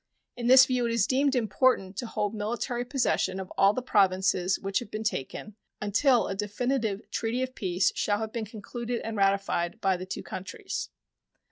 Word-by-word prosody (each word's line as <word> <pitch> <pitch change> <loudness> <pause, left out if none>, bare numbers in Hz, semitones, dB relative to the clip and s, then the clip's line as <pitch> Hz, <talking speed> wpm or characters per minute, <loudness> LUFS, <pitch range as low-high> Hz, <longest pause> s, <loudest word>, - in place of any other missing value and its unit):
In 240 -1 -3
this 260 +1 +9
view 250 -2 0
it - - -1
is 230 -3 +2
deemed 270 +2 +2
important 220 -3 +1
to 240 - -3
hold 210 -1 -2
military 235 +3 -2
possession 245 -7 0
of 190 -1 -7
all 195 +1 +5
the 250 +4 -4
Provinces 190 -4 +2
which 195 0 -1
have 240 - -9
been 215 +1 -4
taken 210 +2 -4 0.2
until 235 +5 +3
a - - -2
definitive 215 +1 -2
treaty 235 +3 -1
of 255 0 -4
peace 185 -5 +1
shall 205 -1 0
have 220 0 -5
been 230 -2 -3
concluded 235 +3 -5
and 225 0 -4
ratified 195 -1 +1
by 190 -4 +1
the 185 +1 -7
two 190 - -5
countries. 190 +1 -5
215 Hz, 180 wpm, -28 LUFS, 195-245 Hz, 0.2 s, this